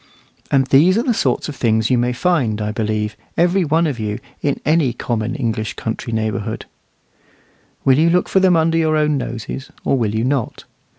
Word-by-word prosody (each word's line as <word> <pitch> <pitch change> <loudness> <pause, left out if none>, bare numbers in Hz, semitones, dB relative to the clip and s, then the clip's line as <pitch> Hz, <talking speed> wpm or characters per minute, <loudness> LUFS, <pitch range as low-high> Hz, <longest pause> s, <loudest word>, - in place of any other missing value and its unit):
And 135 -1 +3
these 160 +9 +4
are 235 - +1
the 250 - +1
sort - - 0
of 150 - -6
things 110 -1 +1
you 125 - +4
may 120 +1 +1
find, 125 - 0
I 105 0 -2
believe, 110 -1 -2 0.2
every 180 +3 +3
one 160 +2 +2
of 140 -7 -2
you, 105 -1 -2 0.2
in 140 -1 -1
any 155 -5 +2
common 120 +1 -3
English 110 -6 -2
country 115 +1 -4
neighbourhood. 110 -2 -2 1.2
Will 135 +1 +5
you 165 +2 +4
look 180 +1 +2
for 190 - +2
them 185 -2 +4
under 165 0 +2
your 155 -1 +2
own 150 -1 +2
noses, 130 0 -5 0.2
or - - +2
will 110 -2 -1
you 110 - 0
not? 130 -2 -2
130 Hz, 190 wpm, -19 LUFS, 110-160 Hz, 1.2 s, Will